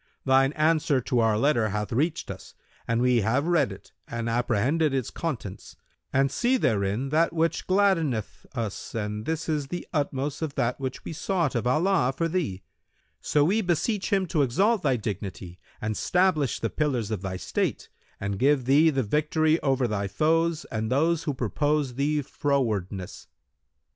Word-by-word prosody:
Thine 135 0 +4
answer 155 -3 +2
to 125 0 0
our 110 -2 +3
letter 120 -3 +2
hath 105 +1 -3
reached 150 +7 -1
us - - -11 0.3
and 115 +1 +1
we 125 -2 +3
have 125 +8 +1
read 165 -9 +2
it 95 - -12 0.2
and 115 0 -4
apprehended 125 +6 +1
its 130 -4 -2
contents 125 - -5 0.4
and 135 0 +2
see 250 - +2
therein 110 - 0
that 160 +4 +2
which 165 0 0
gladdeneth 175 - +1
us 115 -3 -4
and 105 0 -3
this 160 0 -2
is 150 -3 -1
the 175 +5 -5
utmost 145 -1 -2
of 155 -3 -3
that 120 +3 0
which 130 -1 -5
we - - -5
sought 170 -3 -1
of 120 0 -1
Allah 155 0 +2
for 165 - +1
thee; 155 - -2 0.6
so 150 - +2
we 200 +9 +2
beseech 185 +3 0
Him 195 -2 +2
to 155 - +1
exalt 190 - +2
thy 135 -4 +2
dignity 95 -4 -5 0.2
and 110 0 -2
stablish 175 - +1
the 115 - -2
pillars 125 -8 -1
of 105 -4 -2
thy 95 -1 -4
state - - -2 0.3
and 100 0 -3
give 135 0 +3
thee 145 +5 +5
the 135 -3 0
victory 155 +6 +1
over 135 -3 +1
thy 100 -2 -2
foes 160 - +1
and 110 -1 -2
those 160 +4 +2
who 145 - -1
purpose 145 +4 0
thee 145 +3 0
frowardness. 110 -10 -2
135 Hz, 170 wpm, -26 LUFS, 115-160 Hz, 0.6 s, thee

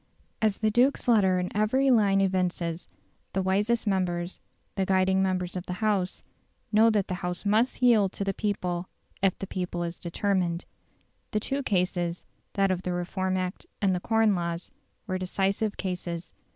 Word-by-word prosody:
As 215 -2 +2
the 215 -1 +3
duke's 250 +5 +2
letter 200 -6 +4
in 180 +1 -3
every 260 +6 +3
line 200 -4 +4
evinces, 180 -3 -1 0.5
the 190 - 0
wisest 205 +5 +1
members, 180 -3 -1 0.3
the 195 - 0
guiding 190 0 +3
members 185 -1 -1
of 180 0 -5
the 180 - -2
House, 195 -2 0 0.5
know 220 +1 +6
that 210 -3 +1
the - - -3
House 180 +2 -3
must 225 +5 +2
yield 215 -6 +5
to - - -3
the 195 0 -1
people 180 -4 -2 0.3
if 195 -2 +2
the - - -4
people 180 -2 -3
is 170 0 -5
determined. 175 -1 -1 0.6
The 215 - 0
two 275 +6 -2
cases 180 -6 -1 0.3
that 195 -1 +2
of 185 -1 -1
the 180 -1 -2
Reform 185 +1 -1
Act 185 0 -4
and 195 -2 +2
the 180 - 0
Corn 225 +1 +3
Laws 170 -1 -3 0.3
were 185 -3 -2
decisive 195 +3 -1
cases. 180 -2 -4
190 Hz, 165 wpm, -27 LUFS, 180-210 Hz, 0.6 s, know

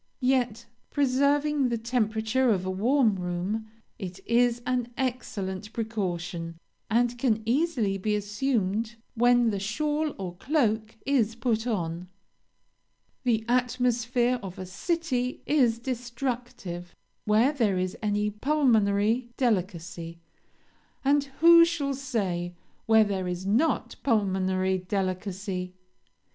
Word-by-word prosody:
Yet, 245 -3 +1 0.2
preserving 285 0 +2
the 235 - 0
temperature 230 +2 +1
of 190 -4 +1
a 185 - -1
warm 225 +2 +2
room, 180 +5 -3 0.3
it 185 -1 -6
is 240 0 +3
an 250 -1 -1
excellent 215 -6 -3
precaution, 175 -7 -3 0.3
and 240 +1 +1
can 225 -4 +1
easily 240 -6 +1
be 210 +2 0
assumed 210 0 -1 0.2
when 240 -1 +4
the 200 - -2
shawl 295 +9 -1
or 180 -3 -6
cloak 220 - 0
is 235 -6 +2
put 230 0 -1
on. 175 -5 -2 1.2
The 225 -3 +1
atmosphere 245 0 +1
of 190 -3 -8
a 185 - -5
city 255 - -2
is 250 -6 +3
destructive 240 -7 -5 0.3
where 220 +6 +4
there 220 -9 +1
is 185 0 -1
any 210 0 0
pulmonary 225 -3 +2
delicacy, 175 -7 -2 0.9
and 285 +1 +3 0.2
who 335 0 +9
shall 320 -5 0
say, 195 -10 -2 0.3
where 220 -1 +6
there 195 -3 -2
is 180 +1 -4
not 230 +11 +1
pulmonary 190 -5 +1
delicacy? 185 0 -3
225 Hz, 110 wpm, -27 LUFS, 190-250 Hz, 1.2 s, who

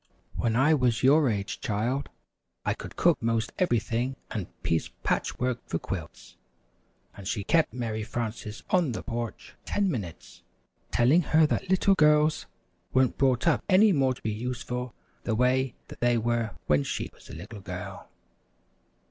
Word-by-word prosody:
"When 115 -2 0
I 140 +6 +5
was 125 -5 +2
your 140 +1 +5
age, 100 -3 -2
child, 120 +7 -1 0.6
I - - +2
could - - -9
cook 170 -4 +3
'most 115 -1 0
everything 120 - 0 0.2
and 100 -5 -3 0.2
piece 80 - 0
patch - - 0
work 125 -1 -1
for - - -1
quilts," 80 -1 -7 0.8
and 100 -2 -8
she 100 0 -1
kept 165 +8 +3
Mary 115 -3 -3
Frances 110 -1 -5
on 170 -9 +3
the - - -5
porch 120 -2 -5
ten 200 -2 0
minutes, 95 - -6 0.5
telling 135 +9 +4
her 160 -1 +4
that 155 - -1
little 190 +1 +4
girls 150 -2 +3 0.4
weren't 130 -1 +2
brought 130 -3 +2
up 165 - +3
any 205 +3 +6
more 135 -6 +2
to - - -16
be 110 - 0
useful 125 +1 -4 0.3
the 115 - 0
way 125 +1 +2 0.2
they 120 0 +3
were 115 -1 -1
when 75 -1 +3
she - - -3
was - - -18
a - - -8
little 100 +6 -9
girl. - - -7
120 Hz, 155 wpm, -28 LUFS, 110-140 Hz, 0.8 s, any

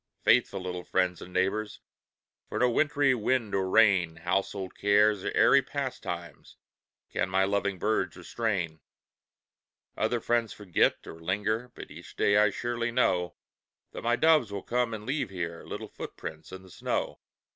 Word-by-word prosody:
Faithful 95 - +3
little 90 -1 -5
friends 90 -1 0
and 90 - -10
neighbors, 95 +4 -1 0.7
For - - -4
no 125 -1 +3
wintry 145 0 +3
wind 120 -1 0
or 95 -1 0
rain, 95 -7 +4
Household 95 +2 -2
cares 105 0 +3
or - - -2
airy - - +6
pastimes, - - -6 0.5
Can 95 - -1
my 95 +1 +2
loving 100 0 0
birds 110 +4 -1
restrain. 95 -9 -2 1.2
Other 120 - 0
friends 115 -1 0
forget, 100 -5 +1
or 80 - -10
linger, 105 +7 -2
But - - -10
each - - -12
day 100 - +3
I 105 0 +5
surely 120 +3 -2
know 90 -8 +1 0.6
That - - -7
my 120 +1 +2
doves 155 -7 +4
will 100 -1 -5
come 120 -2 0
and 105 -1 -9
leave 135 -2 -1
here 85 -3 -5
Little - - -6
footprints 80 -1 -8
in 95 0 -9
the 95 - -16
snow. - - -3
100 Hz, 155 wpm, -28 LUFS, 95-115 Hz, 1.2 s, airy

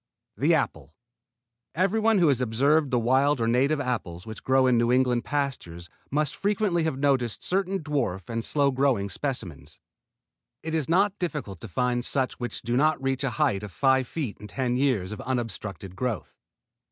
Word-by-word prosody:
THE - - +3
APPLE 80 - -3 0.8
Everyone 215 +5 +2
who 170 -5 +4
has 130 -3 +2
observed 140 +6 +2
the 125 - +1
wild 130 +4 +2
or 115 - +1
native 135 +6 +2
apples 110 -10 -3
which 110 0 -8
grow 130 0 +3
in 125 -1 +4
New 120 +1 +2
England 125 -1 +2
pastures 125 - -3 0.2
must 150 0 0
frequently 200 -3 0
have 155 -5 -1
noticed 135 -5 0
certain 190 -1 0
dwarf 125 - -2
and 115 0 -3
slow 140 +1 +2
growing 130 -7 +1
specimens. 85 - -4 0.9
It 160 0 -4
it 160 -3 -1
not 195 +4 +2
difficult 150 - -4
to 115 - -7
find 120 +5 0
such 130 0 -1
which 120 -1 -4
do 120 +1 -1
not 155 +4 +3
reach 135 0 -1
a 135 - +1
height 135 -11 +2
of 105 -2 -7
five 130 +3 +2
feet 140 -9 -4
in 105 - -9
ten 125 +1 -1
years 125 -8 +1
of 105 - -6
unobstructed 105 -6 -4
growth. 120 -1 -3
130 Hz, 175 wpm, -26 LUFS, 115-145 Hz, 0.9 s, who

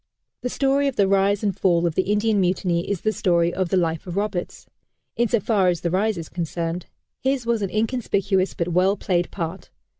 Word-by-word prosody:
The 250 - -2
story 275 +2 +1
of 275 - -2
the 200 - +3
rise 200 +1 +2
and 200 -3 0
fall 175 -2 +2
of 170 - 0
the 185 +4 0
Indian 210 -1 +2
Mutiny 180 -1 0
is 200 -4 -1
the 215 - +1
story 175 -4 +1
of 185 -2 -1
the 190 - +2
life 165 -1 -1
of 180 +1 -5
Roberts 200 -3 -3 0.5
in 235 +1 +2
so 235 - +2
far 200 -2 +2
as 175 -2 +1
the 170 - -1
rise 205 +2 +1
is 165 -2 -6
concerned. 170 0 -4 0.3
His 265 -2 0
was 235 -2 +1
an 195 - -1
inconspicuous 205 -4 0
but 170 +1 -2
well 185 +4 +2
played 175 -3 0
part. 170 0 -5
190 Hz, 210 wpm, -23 LUFS, 175-215 Hz, 0.5 s, the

